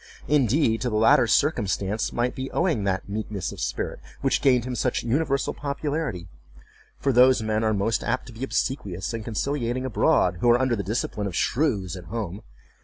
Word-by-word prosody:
Indeed, 135 -4 +2
to 125 - 0
the 110 - -2
latter 120 +4 +5
circumstance 105 -7 +1
might 120 +1 0
be 130 0 -5
owing 160 - 0
that 95 -1 -1
meekness 105 -2 -4
of - - -10
spirit - - -3 0.2
which - - +1
gained 125 -4 +3
him 130 - -3
such 125 0 -1
universal 140 +2 0
popularity; 140 - -3 0.7
for 135 - 0
those 125 -1 +5
men 110 0 0
are 110 - +2
most 105 +2 0
apt 130 - -1
to 125 - -11
be 115 +4 -7
obsequious 105 -8 -2
and 115 -1 -4
conciliating 125 +2 -2
abroad, 90 -7 +2
who 120 - +3
are 120 +1 +5
under 130 -2 +2
the 100 - -2
discipline 105 0 -2
of 95 - -5
shrews 100 - 0
at 90 -1 -9
home. 105 -4 -5
120 Hz, 180 wpm, -25 LUFS, 105-130 Hz, 0.7 s, latter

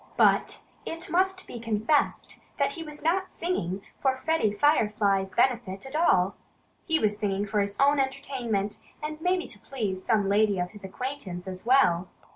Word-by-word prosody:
But - - +3 0.2
it 330 0 -5
must 375 +2 +1
be 240 - -8
confessed 230 +6 0 0.2
that 280 0 +1
he 330 - -6
was 300 -2 -7
not 370 +4 +1
singing 195 - -2 0.2
for 265 -1 +2
Freddie 315 -7 +1
Firefly's 205 -6 +2
benefit 230 -6 +1
at 270 +2 -8
all. 195 - +3 0.5
He 325 -2 +3
was 210 -6 0
singing 200 -1 0
for 210 +1 0
his 200 0 -1
own 280 +1 +4
entertainment 260 -7 -1 0.3
and 305 +1 -5
maybe 360 +1 +1
to 205 - -7
please 200 -7 -3
some 215 -4 +2
lady 205 0 +3
of 180 0 -2
his 210 -2 -12
acquaintance 195 -4 -5
as 185 +4 -7
well. 190 -9 +4
230 Hz, 165 wpm, -27 LUFS, 200-295 Hz, 0.5 s, own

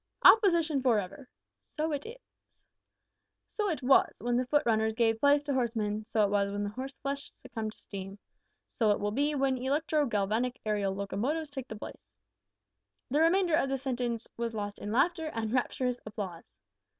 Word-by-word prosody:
Opposition 340 -9 +6
for 250 -4 +3
ever! 205 +7 -8 0.5
So 310 +1 0
it 290 +6 -3
ever 460 - -6
is. - - -31 0.9
So 420 -2 0
it 310 -6 -3
was 265 +2 +5
when 245 +1 0
foot 295 +2 +3
runners 220 -1 +2
gave 225 -1 +2
place 285 +2 +4
to 290 -1 -2
horsemen; 220 -4 -1
so 225 -2 +2
it 200 - +1
was 200 -1 +1
when 205 0 -2
horseflesh 275 +5 -5
succumbed 220 -1 -6
to - - -17
steam. 195 0 -8 0.6
So 220 -3 +4
it 205 - +3
will 205 0 -1
be 290 +6 +1
when 265 -2 +1
electro 290 +3 +1
galvanic 220 +3 0
aerial 205 -2 0
locomotives 245 +11 -2
take 265 -3 -6
the 220 - -7
place 210 - -9 0.6
." 100 -1 -54
(The 295 +3 +3
remainder 345 +1 +3
of 305 -4 +3
the 270 - 0
sentence 245 -3 -2
was 230 -1 -3
lost 205 -1 -4
in 205 - -5
laughter 320 +7 +2
and 225 0 -2
rapturous 250 -1 0
applause.) 195 -5 -7
245 Hz, 175 wpm, -30 LUFS, 210-285 Hz, 0.9 s, Opposition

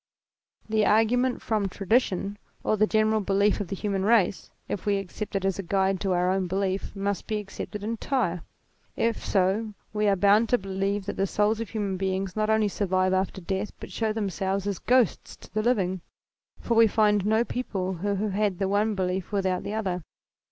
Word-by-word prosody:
The 220 -1 +2
argument 240 +5 +2
from 210 -3 0
tradition 200 0 0 0.2
or - - +2
the 215 0 +3
general 215 0 +2
belief 200 +2 +2
of 205 - -3
the 195 - -4
human 195 -1 -2
race, 205 -3 +2 0.2
if 205 - -4
we 200 -1 +3
accept 195 +2 -6
it 195 -1 0
as 195 0 0
a - - +1
guide 190 +1 +1
to 195 -2 +1
our 180 +1 +2
own 190 -1 0
belief, 190 +2 -2
must 200 0 -2
be 215 - -1
accepted 205 0 -6
entire: 225 -5 -1 0.5
if 230 -1 0
so 200 +3 +1 0.2
we 210 0 +1
are 200 - +4
bound 205 +4 +4
to 245 - +4
believe 195 0 -2
that 200 - -4
the 195 - +1
souls 210 +3 +1
of 230 - -4
human 205 -4 -2
beings 190 0 -2
not 215 0 0
only 220 -1 +3
survive 185 -2 +1
after 190 0 -1
death 190 +3 -3
but - - -9
show 220 -1 -1
themselves 195 -2 -2
as 200 -3 -2
ghosts 245 -3 +1
to - - -17
the 215 - +1
living; 190 -6 +1 0.6
for 235 - -1
we 225 0 +6
find 210 -2 +3
no 220 +3 +3
people 195 -7 -3
who 200 +3 -1
have 205 +1 -1
had 205 -2 0
the 195 - 0
one 205 +2 +1
belief 185 0 -2
without 190 -3 0
the 210 - -4
other. 185 -5 -2
200 Hz, 195 wpm, -26 LUFS, 190-215 Hz, 0.6 s, we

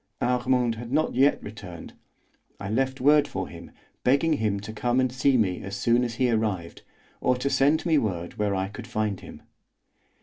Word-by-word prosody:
Armand 125 -1 +1
had 115 +1 -8
not 155 +3 +1
yet 135 +3 +3
returned. 100 -5 -9 0.7
I 100 +1 -5
left 130 +3 0
word 145 +2 +5
for 95 -1 -4
him, 85 0 -11 0.3
begging 140 +5 +3
him 105 -7 0
to 105 +2 -7
come 120 +3 0
and 130 -1 +2
see 130 +1 +2
me 95 -6 0
as 100 +1 -6
soon 120 +4 +2
as 120 -2 -3
he 125 0 +2
arrived, 105 -7 -2 0.4
or 125 - +2
to 140 +2 -1
send 145 +5 +3
me 160 -3 +4
word 90 -6 -4
where 105 -2 +1
I 95 0 -1
could 110 +4 -9
find 110 -4 -2
him. - - -12
120 Hz, 190 wpm, -26 LUFS, 100-130 Hz, 0.7 s, word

